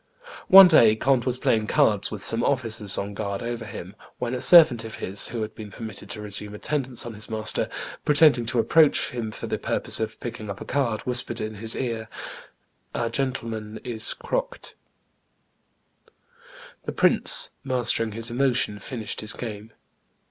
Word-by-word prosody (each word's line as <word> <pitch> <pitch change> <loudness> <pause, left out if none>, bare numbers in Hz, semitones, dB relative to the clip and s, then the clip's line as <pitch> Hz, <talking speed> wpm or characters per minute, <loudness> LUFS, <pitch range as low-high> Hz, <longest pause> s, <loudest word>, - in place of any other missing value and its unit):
One 190 0 +10
day 115 -10 +5
Conde 130 +1 +1
was 125 -1 0
playing 110 -4 0
cards 105 -2 +2
with 105 -2 -5
some 115 +1 +1
officers 110 -7 -1
on 100 +1 -4
guard 100 0 -4
over 120 -1 -5
him, 100 -2 -9 0.2
when 125 0 -4
a 125 - -3
servant 160 -10 +7
of 110 -1 -8
his 100 +2 -3
who 115 -2 -4
had 110 0 -7
been 105 -2 -10
permitted 105 -2 -8
to 105 - -6
resume 105 0 -2
attendance 130 0 -2
on 120 - -7
his 105 0 -6
master, 110 -1 -1 0.3
pretending 145 -5 +4
to 120 +2 -1
approach 145 +7 +3
him 120 -3 -4
for 110 - -7
the - - -3
purpose - - +1
of 110 -1 -4
picking 115 -3 -7
up 100 - -6
a - - -8
card, 125 -6 -1
whispered 125 0 0
in 110 0 -4
his 110 +2 -3
ear, 115 -4 -4 0.9
"Our 115 -1 -1
gentleman 115 -5 -4
is 115 -3 -1
croqued." - - -4 2.1
The - - -3
prince, - - +3
mastering 120 -3 0
his 115 +2 -4
emotion, 120 -5 0
finished 115 0 -6
his 110 - -3
game. 110 -2 -8
115 Hz, 165 wpm, -24 LUFS, 110-125 Hz, 2.1 s, One